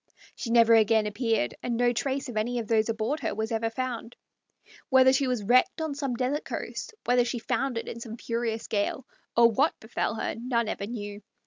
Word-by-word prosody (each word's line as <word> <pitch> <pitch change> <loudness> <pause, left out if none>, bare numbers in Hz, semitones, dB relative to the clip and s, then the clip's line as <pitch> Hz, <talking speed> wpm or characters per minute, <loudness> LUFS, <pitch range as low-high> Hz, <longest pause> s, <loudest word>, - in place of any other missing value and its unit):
She 240 - -5
never 230 -1 +6
again 220 -1 +4
appeared, 220 - 0
and 235 -2 -2
no 240 0 +3
trace 270 +3 -2
of 245 - -7
any 235 +3 0
of 230 -3 -3
those 220 0 +2
aboard 225 +7 -1
her - - -2
was 220 +2 -2
ever 225 0 0
found. 240 -1 -4 0.7
Whether 260 -1 +6
she 265 0 +2
was 250 -4 -1
wrecked 245 +9 +3
on 315 -2 -2
some 275 -3 -2
desert 260 +5 -1
coast, 445 - -5
whether 245 0 +4
she 240 +1 -2
foundered 245 +1 -2
in 235 - -6
some 230 -1 -7
furious 230 -1 -2
gale, 210 +4 -1 0.3
or 235 0 +7
what 280 +8 +1
befell 220 0 -2
her 220 - -2
none 235 -1 -1
ever 200 -2 -3
knew. 205 -3 -6
235 Hz, 200 wpm, -27 LUFS, 225-255 Hz, 0.7 s, or